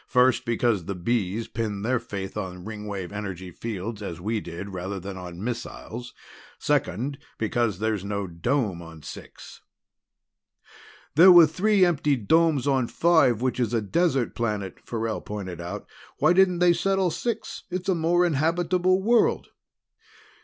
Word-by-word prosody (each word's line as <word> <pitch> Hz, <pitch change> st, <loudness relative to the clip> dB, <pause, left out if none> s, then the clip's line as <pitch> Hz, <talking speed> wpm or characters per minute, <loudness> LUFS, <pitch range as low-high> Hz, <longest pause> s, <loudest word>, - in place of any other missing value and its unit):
"First, 125 Hz, +1 st, +3 dB
because 115 Hz, -6 st, +1 dB
the 100 Hz, -, -4 dB
Bees 105 Hz, +2 st, -1 dB
pinned 110 Hz, -3 st, -3 dB
their 125 Hz, +1 st, +1 dB
faith 100 Hz, -4 st, -6 dB
on 90 Hz, -3 st, -5 dB
Ringwave 105 Hz, -4 st, -6 dB
energy 95 Hz, -3 st, -6 dB
fields, 110 Hz, +2 st, -5 dB
as 85 Hz, -5 st, -6 dB
we 110 Hz, +5 st, -1 dB
did, 95 Hz, +1 st, -7 dB
rather 95 Hz, +2 st, -4 dB
than 95 Hz, +2 st, -7 dB
on 90 Hz, 0 st, -8 dB
missiles. 120 Hz, 0 st, -6 dB, 0.4 s
Second, 130 Hz, +9 st, -1 dB, 0.2 s
because 110 Hz, -2 st, 0 dB
there's 110 Hz, -1 st, -1 dB
no 100 Hz, 0 st, -2 dB
dome 90 Hz, +2 st, -1 dB
on 80 Hz, -2 st, -12 dB
Six." -, -, -11 dB, 1.5 s
"There 180 Hz, +5 st, +8 dB
were 175 Hz, -2 st, +9 dB
three 190 Hz, +5 st, +3 dB
empty 150 Hz, -4 st, +2 dB
domes 150 Hz, +4 st, +2 dB
on 135 Hz, -4 st, +2 dB
Five, 145 Hz, -9 st, +3 dB
which 130 Hz, 0 st, 0 dB
is 120 Hz, -1 st, 0 dB
a -, -, +3 dB
desert 140 Hz, -, +1 dB
planet," 105 Hz, -5 st, -3 dB
Farrell 115 Hz, -1 st, -3 dB
pointed 95 Hz, -5 st, -6 dB
out. 85 Hz, +1 st, -6 dB, 0.3 s
"Why -, -, +4 dB
didn't 185 Hz, -1 st, +4 dB
they 175 Hz, 0 st, +5 dB
settle 190 Hz, +1 st, +1 dB
Six? 225 Hz, +7 st, -4 dB
It's 185 Hz, +1 st, -4 dB
a 190 Hz, -, +3 dB
more 175 Hz, +1 st, +2 dB
habitable 175 Hz, +4 st, +1 dB
world." 235 Hz, +2 st, +2 dB
115 Hz, 145 wpm, -25 LUFS, 100-165 Hz, 1.5 s, were